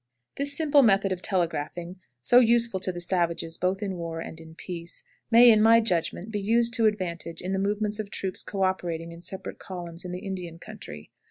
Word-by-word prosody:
This 285 +1 0
simple 295 -3 +5
method 195 -5 +3
of 185 -1 -2
telegraphing, 175 -1 -2 0.3
so 245 - +6
useful 235 -4 +3
to 185 0 -1
the 175 - -7
savages 170 -2 -1
both 190 +3 0
in 190 -3 -3
war 165 -1 -5
and 165 0 -7
in 160 0 -13
peace, 170 -1 -7 0.3
may, 235 +1 +8
in 215 -1 +5
my 225 +1 +7
judgment, 190 -1 -1
be 205 -1 -2
used 230 +3 +2
to 225 -2 +3
advantage 170 -5 -3
in 185 - -3
the 190 - 0
movements 210 +1 -1
of 210 -2 -4
troops 190 -2 -4
co 195 -2 -3
operating 170 -3 -2
in 170 0 -11
separate 190 +2 -6
columns 175 -2 -8
in 180 - -6
the 180 +3 -6
Indian 180 -4 -5
country. 170 - -10
190 Hz, 200 wpm, -26 LUFS, 170-215 Hz, 0.3 s, may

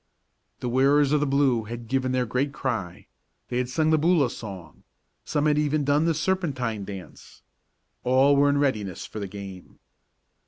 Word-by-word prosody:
The - - -2
wearers 135 +3 +3
of 150 - +3
the 150 - 0
blue 135 -5 +2
had 115 +1 -7
given 130 +1 0
their 130 -1 +1
great 125 +5 -1
cry 100 -8 -4 0.4
they 125 - -1
had 125 -1 -2
sung 155 +4 +1
the 155 - +4
Boola 155 -6 +3
song 95 -8 -9 0.4
some 145 0 0
had 150 -1 +3
even 150 0 +1
done 145 +3 +2
the 165 -1 +1
serpentine 140 - -1
dance. 95 -3 -11 0.6
All 130 +3 +4
was 145 +1 +4
in 145 - +2
readiness 110 -10 -1
for 110 - -7
the 100 - -4
game. 95 -2 -10
130 Hz, 170 wpm, -25 LUFS, 110-145 Hz, 0.6 s, the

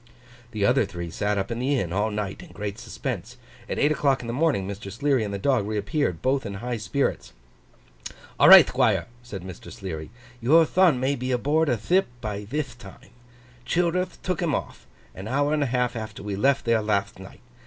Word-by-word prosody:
The 105 -4 -1
other 125 +5 +4
three 85 -4 -6
sat 105 +4 -1
up 95 +3 -2
at 115 - -3
the 135 +2 +1
inn 85 -5 -3
all 105 +3 +1
night 105 -2 -4
in - - -13
great 105 -1 -6
suspense. - - -5 0.3
At - - -2
eight 145 - +3
o'clock 140 -3 +1
in - - -8
the 115 - -3
morning 135 -9 +1
Mr. 100 0 -7
Sleary 135 +2 +1
and 105 - -4
the 100 - -3
dog 115 -1 +1
reappeared: 105 - -1
both 135 +1 +1
in 100 - -5
high 120 +4 -3
spirits. 125 - -2 1.1
'All - - +7
right, - - +11
Thquire!' - - +1 0.2
said 105 -7 -8
Mr. 95 -2 -10
Sleary, 80 -5 -6 0.3
'your 160 +8 +5
thon 175 -5 +3
may 135 +2 +1
be 130 0 -3
aboard 145 +5 +1
a 120 - +2
thip 180 - +2
by 105 -3 -5
thith 130 0 -4
time. 100 -5 -14 0.5
Childerth 180 +3 0
took 185 0 -2
him 160 -6 +1
off, - - -6 0.3
an 95 +3 -8
hour 145 +5 +1
and 155 - +1
a 140 - +1
half 125 0 0
after 110 -2 -6
we 100 -1 -3
left 135 +7 +2
there 115 -1 +3
latht 100 -3 -1
night. 95 0 -12
120 Hz, 205 wpm, -25 LUFS, 100-140 Hz, 1.1 s, right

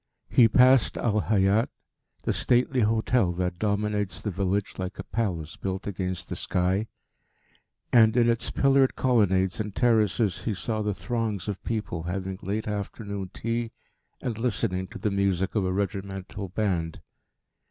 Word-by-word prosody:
He 120 - +7
passed 130 +1 +5
Al 105 -3 +1
Hayat, 105 +2 +3 0.5
the - - 0
stately 125 +1 +2
hotel 110 -2 +2
that 90 0 -2
dominates 105 -2 -1
the 105 - -3
village 100 +2 -1
like 95 +1 -4
a - - -5
palace 85 -9 -3
built 95 0 -4
against 95 -2 -3
the - - -4
sky; 95 +4 0 1.1
and 110 0 +6
in 120 -1 +5
its 115 0 +1
pillared 135 -1 +3
colonnades 100 -7 +2
and 105 -2 -4
terraces 110 -5 +2
he 110 0 -2
saw 110 +3 -2
the 105 -2 -1
throngs 115 -5 -2
of 100 -2 -4
people 105 -7 -3
having 95 +2 -4
late 105 +4 -3
afternoon 100 -1 -4
tea 115 0 -3 0.5
and 115 -3 -4
listening 100 -5 -1
to - - -9
the 105 - -1
music 100 -1 0
of 105 -4 +1
a - - 0
regimental 95 0 -4
band. 90 -5 -1
105 Hz, 150 wpm, -26 LUFS, 95-115 Hz, 1.1 s, He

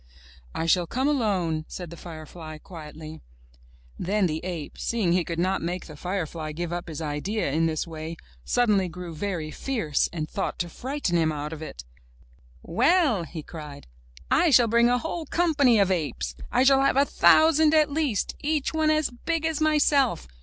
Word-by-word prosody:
''I 165 - -1
shall 175 0 +3
come 260 - 0
alone," 190 - 0
said 175 -3 -7
the - - -8
firefly 160 -1 -9
quietly. 155 -1 -10 0.8
Then 200 +2 +1
the 160 -1 -2
ape, 175 -5 -6
seeing 210 -7 0
he 180 -1 +2
could 165 0 -5
not 185 +3 0
make 175 +2 -3
the 155 - -10
firefly 165 -2 -4
give 175 +2 -4
up 175 0 -4
his 160 0 -5
idea 150 +5 -2
in 165 +3 +2
this 155 -1 -1
way, 160 0 -7 0.3
suddenly 210 -6 +2
grew 175 0 -7
very 160 -2 -3
fierce 215 - -1
and 155 -3 -4
thought 195 - -3
to 175 - -3
frighten 255 - -2
him 160 -1 +2
out 150 +1 -4
of 155 - -8
it. 60 - -8 0.8
*'Well," 260 - +2
he 160 -1 -7
cried, 150 -3 -9 0.4
'1 335 -3 +4
shall 240 -1 +7
bring 235 +2 +4
a 245 - +3
whole 320 +3 -4
company 285 -9 +3
of 195 -2 +3
apes! 145 - -2 0.2
I - - +3
shall 270 0 +5
have 275 -1 +2
a 280 - +5
thousand 315 +1 +5
at 305 -2 +4
least, 280 -9 -1
each 300 0 -1
one 315 -1 +2
as 310 -3 +2
big 325 +6 -2
as 320 -1 -1
myself! 290 - +2
180 Hz, 180 wpm, -26 LUFS, -, 0.8 s, shall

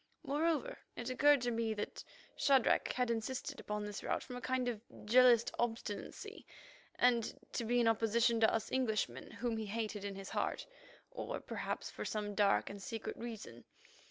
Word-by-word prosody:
Moreover, 325 - 0 0.2
it 245 - -4
occurred 285 +1 +5
to 245 0 0
me 225 -1 0
that 210 - -5 0.3
Shadrach 270 -4 +4
had 250 -2 +1
insisted 230 +3 -3
upon 210 0 -3
this 205 0 -5
route - - -1
from 250 - -8
a 245 - -6
kind 255 0 0
of 230 -4 -2 0.2
jealous 240 +1 +7
obstinacy, 230 -3 -3 0.5
and 240 -2 +2
to - - -1
be 240 +2 +2
in 235 - +4
opposition 225 +1 +3
to 220 - +5
us 225 -2 -1
Englishmen, 215 - 0
whom 235 -2 -2
he 220 -1 -3
hated 215 -1 -3
in 200 -1 -4
his 195 0 -7
heart, - - -1 0.5
or - - -4
perhaps - - -4
for - - -5
some 210 -1 -2
dark 205 -1 +3
and 200 0 -7
secret 225 +2 -4
reason. 220 - -7
230 Hz, 170 wpm, -36 LUFS, 210-250 Hz, 0.5 s, jealous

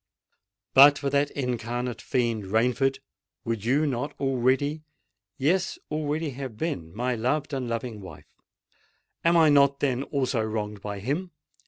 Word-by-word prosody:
But 145 +2 +8
for 140 -1 -2
that 145 0 +2
incarnate 120 -2 -3
fiend 115 -5 -1
Rainford, 125 +6 +1 0.5
would 115 -3 -2
you 140 +6 +2
not 135 0 -2
already—yes, 140 - -1
already 155 +1 -1
have 130 -4 -7
been 90 - -3
my 125 +3 -1
loved 140 +6 -1
and 130 -3 -2
loving 115 -2 -4
wife? 95 - -11 1.0
Am 170 +1 +4
I 160 -2 +6
not, 140 -1 +4
then, 130 -3 0
also 135 -4 -1
wronged 105 -2 -3
by 100 -1 -5
him? 150 - -2
130 Hz, 135 wpm, -26 LUFS, 115-145 Hz, 1.0 s, But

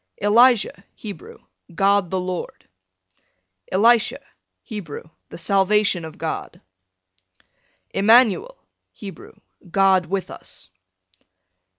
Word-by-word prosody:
Elijah, 225 0 +4
Hebrew, 405 - -9 0.4
God 200 0 +2
the 190 - -1
Lord. 180 -1 -6 1.0
Elisha, 225 +4 +3 0.5
Hebrew, 205 - -7 0.3
the - - -9
salvation 195 0 +2
of 160 - -10
God. - - -5 1.3
Emmanuel, 240 - +3 0.4
Hebrew, 195 -3 -11 0.4
God 190 -1 +3
with 190 +2 -3
us. - - -10
200 Hz, 80 wpm, -22 LUFS, 185-225 Hz, 1.3 s, Elijah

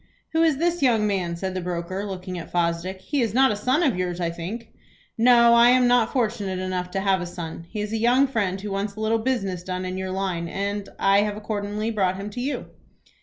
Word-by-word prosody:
"Who 320 - +3
is 320 -4 +3
this 345 +2 0
young 230 -5 +3
man?" 185 -4 -1
said 190 +2 -4
the 185 - -3
broker, 180 +2 -3
looking 185 -2 -5
at 165 - -9
Fosdick. 175 +2 -1
"He 280 +6 -1
is 225 -2 -1
not 265 -1 +5
a - - 0
son 255 +10 +1
of 275 - +2
yours 180 -1 -2
I 170 -1 -1
think?" 180 +8 -6 0.5
"No; 235 0 +6
I 235 +1 +7
am 250 0 +5
not 245 -2 +3
fortunate 215 -6 -1
enough 185 -1 -3
to 195 +1 -2
have 190 -2 +2
a - - -3
son. 170 -1 -7
He 210 - -4
is 210 +1 -4
a - - +1
young 245 +5 +4
friend 205 -8 -1
who 205 +1 -6
wants 200 +1 -2
a - - -9
little 220 +1 +1
business 200 -7 -1
done 185 0 -4
in 185 +1 -4
your 190 0 -3
line 185 -3 -2
and, 200 +3 -3
I 195 +1 +4
have 210 0 -2
accordingly 210 +1 -3
brought 190 -4 0
him 200 +2 -6
to 245 - -5
you." 275 +3 -3
200 Hz, 235 wpm, -24 LUFS, 185-235 Hz, 0.5 s, I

